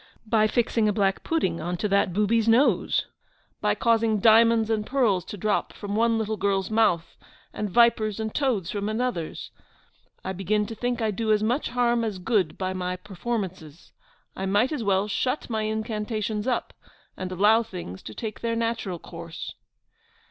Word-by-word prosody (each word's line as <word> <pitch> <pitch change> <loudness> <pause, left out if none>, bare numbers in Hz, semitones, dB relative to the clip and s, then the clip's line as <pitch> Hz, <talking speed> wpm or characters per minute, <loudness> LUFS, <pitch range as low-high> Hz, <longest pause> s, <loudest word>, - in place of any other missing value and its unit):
by 215 -1 +3
fixing 225 -1 +1
a - - +3
black 195 -2 0
pudding 185 - 0
on 175 +2 -3
to 210 - -1
that 200 -2 +2
booby's 210 +4 +2
nose? 235 +5 +3 0.6
by - - +2
causing 225 -2 +2
diamonds 225 +1 +5
and 215 -1 -1
pearls 230 -9 +2
to 205 - -8
drop 210 +2 0
from 205 0 -5
one 230 +1 +3
little 220 -1 -2
girl's 195 0 0
mouth, 200 -7 +2 0.4
and 210 - -3
vipers 220 -1 +3
and 220 -1 -3
toads 235 - 0
from 205 0 -2
another's? 220 -7 -3 0.7
I 190 - -2
begin 205 +3 0
to 225 - -6
think 245 +1 -2
I 220 - +1
do 220 +2 -1
as 215 0 +3
much 245 +7 0
harm 240 -1 +1
as 215 -4 -2
good 185 -3 0
by 185 -1 -2
my 180 -1 -2
performances. 185 -5 -5 0.4
I 190 - -3
might 205 +8 +2
as 295 -7 -2
well 195 0 +2
shut 255 +5 -2
my 220 -1 -1
incantations 215 0 -2
up, 250 - -1 0.4
and 185 0 -5
allow 210 +5 +4
things 180 - -8
to 110 - -9
take 215 -2 -5
their 230 -1 -1
natural 230 -5 -2
course. 170 0 -8
215 Hz, 170 wpm, -25 LUFS, 190-230 Hz, 0.7 s, diamonds